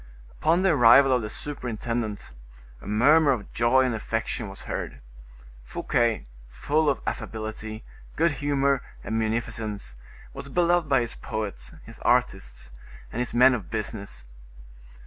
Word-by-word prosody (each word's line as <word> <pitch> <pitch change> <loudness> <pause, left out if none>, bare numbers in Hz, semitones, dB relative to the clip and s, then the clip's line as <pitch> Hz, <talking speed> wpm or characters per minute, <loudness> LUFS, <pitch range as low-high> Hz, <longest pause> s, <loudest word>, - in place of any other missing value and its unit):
Upon 170 +4 +1
the 190 - +4
arrival 135 0 +7
of 125 -1 +3
the 105 - -5
superintendent, 115 -5 -4 0.5
a - - -11
murmur 140 +9 +4
of 105 -6 -7
joy 125 +3 +3
and 125 - 0
affection 110 -1 -3
was 95 - -10
heard; - - -5 0.6
Fouquet, 115 - 0 0.2
full 145 - 0
of 135 - 0
affability, 110 0 -5 0.3
good 170 +1 +3
humor, 140 -2 +1 0.2
and 110 - -2
munificence, 110 - -3 0.4
was 140 - -8
beloved 175 0 +2
by 135 -3 +4
his 120 -1 -4
poets, 100 - -6
his - - -12
artists, - - 0 0.4
and 115 - -4
his 125 -1 -3
men 125 +2 +7
of 105 -8 -4
business. 105 - -5
115 Hz, 135 wpm, -26 LUFS, 110-140 Hz, 0.6 s, arrival